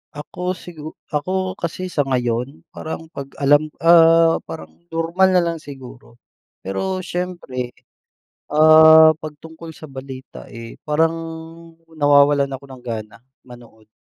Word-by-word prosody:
Ako, 180 Hz, +5 st, -5 dB
sigu 160 Hz, -4 st, -10 dB, 0.2 s
ako 185 Hz, +5 st, -2 dB
kasi 180 Hz, +2 st, -5 dB
sa 145 Hz, -4 st, -1 dB
ngayon, 125 Hz, +1 st, -2 dB
parang 160 Hz, +1 st, -8 dB
'pag 140 Hz, -1 st, -7 dB, 0.2 s
alam, 145 Hz, +2 st, +4 dB, 0.2 s
ah, 165 Hz, -1 st, +6 dB
parang 160 Hz, -, -9 dB, 0.2 s
normal 165 Hz, +3 st, +1 dB
na 180 Hz, -, +4 dB
lang 170 Hz, -1 st, -2 dB
siguro. 130 Hz, -5 st, -13 dB, 0.5 s
Pero 185 Hz, -, -3 dB
siyempre, 175 Hz, -10 st, -5 dB, 0.8 s
ah, 160 Hz, +1 st, +8 dB
'pag 155 Hz, -1 st, -8 dB
tungkol 160 Hz, 0 st, -11 dB
sa 150 Hz, +1 st, -12 dB
balita, 130 Hz, -1 st, -10 dB
eh, 115 Hz, 0 st, -11 dB
parang 160 Hz, +2 st, +1 dB, 0.7 s
nawawalan 145 Hz, -2 st, +3 dB
ako 135 Hz, +1 st, -8 dB
ng 130 Hz, -2 st, -12 dB
gana 110 Hz, -3 st, -6 dB, 0.2 s
manood. 120 Hz, -3 st, -17 dB
155 Hz, 125 wpm, -20 LUFS, 130-165 Hz, 0.8 s, ah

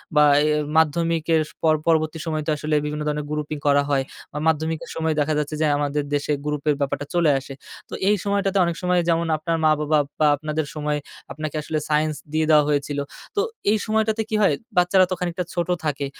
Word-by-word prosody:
বা, 150 Hz, -, +6 dB, 0.2 s
এ -, -, +2 dB, 0.3 s
মাধ্যমিকের 160 Hz, 0 st, +2 dB, 0.2 s
পর 160 Hz, -1 st, +4 dB
পরবর্তী 160 Hz, -1 st, +2 dB
সময়ে 155 Hz, -2 st, -2 dB
তো -, -, +2 dB
আসলে 150 Hz, +1 st, -1 dB
বিভিন্ন 150 Hz, 0 st, -3 dB
ধরনের 150 Hz, 0 st, -2 dB
grouping 150 Hz, 0 st, -3 dB
করা 145 Hz, 0 st, +5 dB
হয়। 135 Hz, -2 st, +2 dB, 0.3 s
বা -, -, -5 dB
মাধ্যমিকের 160 Hz, +1 st, -1 dB
সময়ে 160 Hz, -1 st, 0 dB
দেখা 150 Hz, +1 st, +1 dB
যাচ্ছে 150 Hz, 0 st, -2 dB
যে -, -, +3 dB
আমাদের 145 Hz, 0 st, -1 dB
দেশে 145 Hz, +1 st, -1 dB
group 150 Hz, -1 st, -2 dB
এর 150 Hz, -, +3 dB
ব্যাপারটা 140 Hz, +1 st, -1 dB
চলে 170 Hz, -3 st, +4 dB
আসে। 135 Hz, +1 st, -9 dB, 0.4 s
তো -, -, -10 dB, 0.2 s
এই 210 Hz, -, +4 dB
সময়টাতে 200 Hz, -1 st, 0 dB
অনেক 170 Hz, -1 st, -1 dB
সময় 180 Hz, 0 st, +2 dB
যেমন 170 Hz, 0 st, +2 dB
আপনার 165 Hz, +2 st, -1 dB
মা-বাবা 155 Hz, 0 st, +3 dB, 0.2 s
বা, 155 Hz, -, +5 dB
আপনাদের 155 Hz, +1 st, -3 dB
সময় 150 Hz, -1 st, -1 dB, 0.3 s
আপনাকে 155 Hz, 0 st, -5 dB
আসলে 155 Hz, +1 st, -2 dB
science 155 Hz, 0 st, +1 dB, 0.2 s
দিয়ে 160 Hz, 0 st, +2 dB
দেওয়া 150 Hz, -1 st, +6 dB
হয়েছিল। 145 Hz, 0 st, -1 dB, 0.4 s
তো 405 Hz, -, +2 dB, 0.3 s
এই 220 Hz, -, +3 dB
সময়টাতে 220 Hz, 0 st, +1 dB
কি 220 Hz, -, -1 dB
হয় 195 Hz, -7 st, +4 dB, 0.2 s
বাচ্চারা 180 Hz, +1 st, +5 dB
তো -, -, +2 dB
খানিকটা 180 Hz, 0 st, -2 dB
ছোট 175 Hz, 0 st, -1 dB, 0.2 s
থাকে। 145 Hz, -1 st, -1 dB
155 Hz, 195 wpm, -23 LUFS, 150-170 Hz, 0.4 s, বা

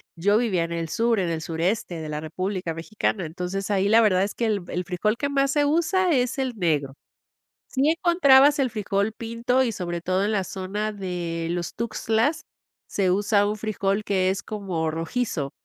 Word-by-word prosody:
Yo 205 Hz, +5 st, +3 dB
vivía 205 Hz, -8 st, +1 dB
en 165 Hz, -, -5 dB
el 165 Hz, -1 st, -3 dB
sur, 230 Hz, +3 st, +1 dB
en 180 Hz, -3 st, 0 dB
el 165 Hz, -1 st, -2 dB
sureste 170 Hz, +1 st, -2 dB
de 155 Hz, -, -6 dB
la 150 Hz, 0 st, -3 dB
República 180 Hz, +2 st, -3 dB
Mexicana, 185 Hz, +3 st, -2 dB
entonces 180 Hz, +5 st, -4 dB
ahí 200 Hz, -1 st, +2 dB
la 225 Hz, +2 st, +6 dB
verdad 190 Hz, -4 st, +3 dB
es 200 Hz, -, -2 dB
que 235 Hz, -, -1 dB
el 210 Hz, -4 st, 0 dB
el 180 Hz, -, -3 dB
frijol 185 Hz, +5 st, 0 dB
que 285 Hz, -, -1 dB
más 275 Hz, -1 st, +2 dB
se 290 Hz, 0 st, +2 dB
usa 340 Hz, +4 st, +2 dB
es 255 Hz, -2 st, +1 dB
el 260 Hz, -2 st, -1 dB
negro. 150 Hz, -7 st, 0 dB, 0.7 s
Sí 275 Hz, +3 st, +1 dB
encontrabas 295 Hz, -4 st, +5 dB
el 265 Hz, -2 st, +2 dB
frijol 205 Hz, -1 st, -1 dB
pinto 230 Hz, +3 st, 0 dB
y, 240 Hz, -, 0 dB
sobre 175 Hz, -3 st, -3 dB
todo, 185 Hz, +2 st, 0 dB
en 210 Hz, -, 0 dB
la 195 Hz, -3 st, +1 dB
zona 200 Hz, +3 st, -3 dB
de 175 Hz, -4 st, -4 dB
los 175 Hz, 0 st, -3 dB
Tuxtlas, 230 Hz, +5 st, 0 dB, 0.4 s
se 190 Hz, -3 st, +1 dB
usa 205 Hz, +1 st, +2 dB
un 215 Hz, -, -3 dB
frijol 210 Hz, -1 st, -1 dB
que 185 Hz, -2 st, +1 dB
es 190 Hz, -, -2 dB
como 185 Hz, -7 st, -3 dB
rojizo 165 Hz, -, -2 dB
200 Hz, 190 wpm, -24 LUFS, 175-230 Hz, 0.7 s, la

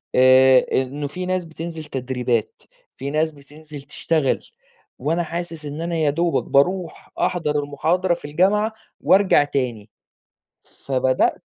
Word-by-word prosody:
آآ، 130 Hz, 0 st, +6 dB, 0.2 s
إنه 140 Hz, +3 st, -4 dB
في 180 Hz, +5 st, -6 dB
ناس 185 Hz, -1 st, -1 dB
بتنزِل 160 Hz, 0 st, -7 dB
تدريبات، 125 Hz, -5 st, -2 dB, 0.4 s
في 140 Hz, +1 st, -4 dB
ناس 155 Hz, +1 st, +1 dB
بتنزِل 150 Hz, +1 st, -12 dB
تشتغل 150 Hz, -1 st, -1 dB, 0.5 s
وأنا 165 Hz, +6 st, 0 dB
حاسس 165 Hz, -2 st, -6 dB
إن 145 Hz, +3 st, -6 dB
أنا 170 Hz, 0 st, -2 dB
يا 155 Hz, -3 st, +2 dB
دوبك 170 Hz, +3 st, 0 dB
بارُوح 175 Hz, +5 st, 0 dB
أحضَر 150 Hz, -5 st, 0 dB
المحاضرة 170 Hz, +6 st, 0 dB
في 170 Hz, -, -7 dB
الجامعة 200 Hz, +8 st, +1 dB, 0.3 s
وأرجع 190 Hz, -6 st, +4 dB
تاني، 120 Hz, -7 st, -3 dB, 1.0 s
فبدأت 130 Hz, -1 st, +1 dB
150 Hz, 125 wpm, -21 LUFS, 135-170 Hz, 1.0 s, آآ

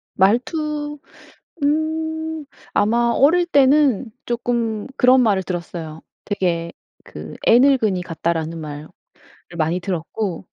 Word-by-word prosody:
말투 295 Hz, -, 0 dB, 0.6 s
음 315 Hz, +1 st, -1 dB, 0.3 s
아마 235 Hz, +3 st, +2 dB
어릴 345 Hz, +6 st, +4 dB
때는 275 Hz, -, +3 dB
쪼끔 235 Hz, -2 st, -2 dB
그런 255 Hz, 0 st, +5 dB
말을 200 Hz, -5 st, +2 dB
들었어요. 170 Hz, -3 st, -6 dB, 0.2 s
되게 170 Hz, -5 st, -1 dB, 0.3 s
그 -, -, -9 dB
"애늙은이 235 Hz, -6 st, +4 dB
같다."라는 165 Hz, -1 st, -3 dB
말을 150 Hz, 0 st, -7 dB, 0.7 s
많이 165 Hz, +3 st, 0 dB
들었고 180 Hz, +1 st, -4 dB
225 Hz, 210 characters per minute, -20 LUFS, 175-285 Hz, 0.7 s, 그런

